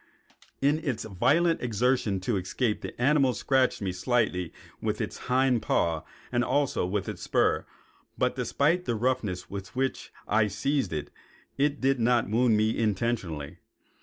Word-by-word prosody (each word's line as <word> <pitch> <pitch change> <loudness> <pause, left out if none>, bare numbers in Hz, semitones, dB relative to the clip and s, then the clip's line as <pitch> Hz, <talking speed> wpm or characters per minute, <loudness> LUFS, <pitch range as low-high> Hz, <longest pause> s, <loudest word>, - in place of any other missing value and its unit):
In 145 +3 +3
its 135 -9 -2
violent 155 - +2
exertions 115 -4 0
to 120 - +1
escape 105 +4 -1
the - - -8
animal 135 -1 +3
scratched 130 -2 +1
me 95 - -1
slightly 90 -3 0 0.3
with - - -1
its - - -4
hind 130 -2 +3
paws 80 -2 +1 0.3
and 120 0 +2
also 140 -9 +1
with 100 +1 -2
its - - -6
spur, - - +1 0.5
but - - +1
despite 170 +6 +1
the 120 - 0
roughness 110 -6 -1
with 100 +2 -8
which 130 +1 -2 0.2
I 105 -1 +3
seized 110 +2 -1
it, 75 -2 -4 0.4
it 145 +1 +1
did 135 0 +2
not 120 0 +3
wound 115 +1 +3
me 110 +1 +2
intentionally. 100 -9 -1
120 Hz, 150 wpm, -28 LUFS, 100-135 Hz, 0.5 s, In